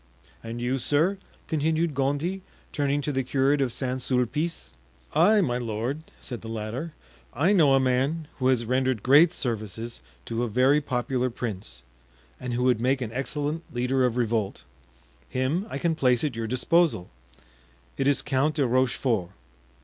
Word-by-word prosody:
"And 115 +1 -6
you, 125 +2 -1
sir?" 155 +10 +1 0.3
continued 160 +1 0
Gondy, 145 +8 -1 0.3
turning 145 0 0
to 150 - -2
the 135 -1 0
curate 135 +2 +1
of 130 -3 +1
St. 130 +1 -2
Sulpice. 130 +6 -1 0.4
"I, 215 0 +5
my 125 -8 0
lord," 120 +5 -3 0.2
said 120 -3 -6
the 115 - -8
latter, 115 +9 -5 0.4
"I 165 +11 +3
know 150 -8 +5
a - - +4
man 135 +5 0
who 130 - +2
has 125 -3 +2
rendered 130 -2 0
great 150 +6 +6
services 115 - -4 0.3
to 115 0 -2
a 120 - 0
very 130 +6 +3
popular 125 -1 -1
prince 110 -5 -6 0.6
and 125 -1 -3
who 125 - 0
would 125 -3 +2
make 130 +2 +1
an 115 -3 -4
excellent 145 +4 -2
leader 125 +2 +1
of 125 -1 +1
revolt. 110 -4 -1 0.7
Him 145 +11 -1
I - - -4
can 165 +3 +1
place 125 -6 +2
at 145 -6 -1
your 115 -1 -3
disposal; 130 - +1 0.8
it 135 - 0
is 140 - +2
Count 145 +2 +1
de 145 -3 +2
Rochefort." 125 -6 +1
130 Hz, 160 wpm, -26 LUFS, 120-145 Hz, 0.8 s, great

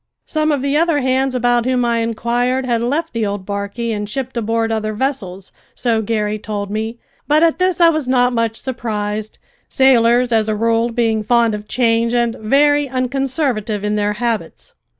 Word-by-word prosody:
Some 310 0 0
of 280 -3 -1
the 280 +1 0
other 325 -2 +2
hands 260 0 0
about 245 -1 +2
whom 250 -1 +1
I 235 -1 +1
inquired 240 +3 -1
had 235 -2 0
left 295 +7 -1
the 230 -1 -1
old 200 -2 -3
barquey 200 +4 -3
and 210 -1 -3
shipped 260 +3 -4
aboard 225 0 -1
other 215 -1 -2
vessels, 210 -7 -3 0.2
so 230 -3 0
Garry 215 -1 -1
told 205 -2 -5
me; 220 +2 -3 0.3
but 300 +2 +4
at 330 +1 +2
this 365 -1 +1
I 340 -1 +7
was 310 -5 -1
not 250 -1 +2
much 230 -1 0
surprised, 215 -4 -4 0.3
sailors 245 -2 +3
as 220 -1 +2
a 215 - 0
rule 230 +2 +1
being 225 -2 0
fond 235 0 +2
of 210 0 -6
change 230 -1 +1
and 235 -1 +1
very 290 +5 +3
unconservative 255 -4 -1
in 210 0 0
their 210 0 0
habits. 230 0 -4
235 Hz, 180 wpm, -18 LUFS, 215-260 Hz, 0.3 s, I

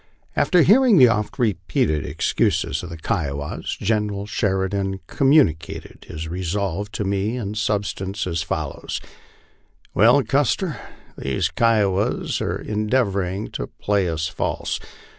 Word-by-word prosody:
After 180 -3 +4
hearing 235 +1 +6
the 125 -5 +8
oft 105 -2 -1
repeated 85 - 0
excuses - - 0
of 90 - -8
the 85 - -7
Kiowas, 75 -2 -3
General 105 -1 0
Sheridan 95 -1 -1
communicated 135 - +1
his 80 +1 -5
resolve 95 +3 -2
to - - -2
me 100 +4 -1
in 105 -4 -4
substance 105 -1 -2
as 85 -3 -1
follows: 80 -2 -3 0.9
"Well, - - +5
Custer, - - 0 0.4
these 65 -1 0
Kiowas 105 -4 +1
are - - -1
endeavoring 105 -3 -1
to - - -4
play 100 -3 0
us 80 -1 -1
false. - - -2
100 Hz, 120 wpm, -22 LUFS, 85-105 Hz, 0.9 s, the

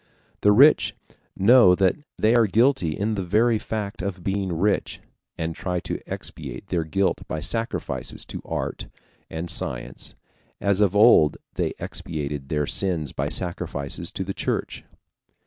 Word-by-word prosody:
The 105 - +5
rich 140 +9 +5 0.4
know 100 -2 +6
that 95 0 +2 0.2
they 110 +2 +3
are 115 -2 +4
guilty 110 - +2
in 105 +2 -1
the 100 -3 -2
very 110 +5 +2
fact 105 -1 -4
of 95 -2 -4
being 95 -1 -1
rich, 95 +5 0 0.4
and 80 0 -2
try 90 +2 -3
to - - -4
expiate 100 - -7
their 85 -3 0
guilt 95 +5 0
by 80 - -3
sacrifices 115 +9 -2
to - - -7
art - - -4 0.4
and 80 +2 -5
science, 65 -7 -2 0.4
as 100 0 +1
of 100 -1 +3
old 105 -8 +6 0.2
they - - -1
expiated 75 -3 -5
their 75 -1 0
sins 80 -5 -1
by - - -2
sacrifices 85 -2 -2
to 95 - -3
the 95 +1 -4
Church. - - -3
95 Hz, 145 wpm, -24 LUFS, 80-105 Hz, 0.4 s, know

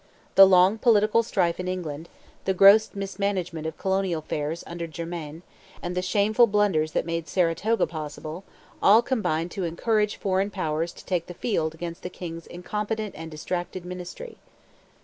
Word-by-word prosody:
The 195 0 +9
long 190 +3 +5
political 215 -1 +4
strife 175 -6 0
in 180 - -3
England, 170 -3 -4 0.4
the 190 - +1
gross 200 +3 +7
mismanagement 195 -5 -2
of 160 - -6
colonial 190 -2 0
affairs 155 +2 -3
under 170 0 -5
Germain, 165 0 -7 0.4
and 175 - -4
the 180 - -1
shameful 215 +5 +3
blunders 195 -7 +1
that - - 0
made 165 -1 -3
Saratoga 180 +7 +1
possible, 155 +2 -7 0.4
all 220 +4 +6
combined 180 -10 -1
to 195 - -4
encourage 210 +5 0
foreign 195 0 0
powers 165 -4 -2
to - - -14
take 175 -3 -1
the 175 - -8
field 160 -9 -1
against 170 +1 -6
the 180 - -5
king's 165 -2 -8
incompetent 210 +4 -4
and 160 +1 -7
distracted 175 +3 -4
ministry. 180 - -8
180 Hz, 155 wpm, -25 LUFS, 165-205 Hz, 0.4 s, The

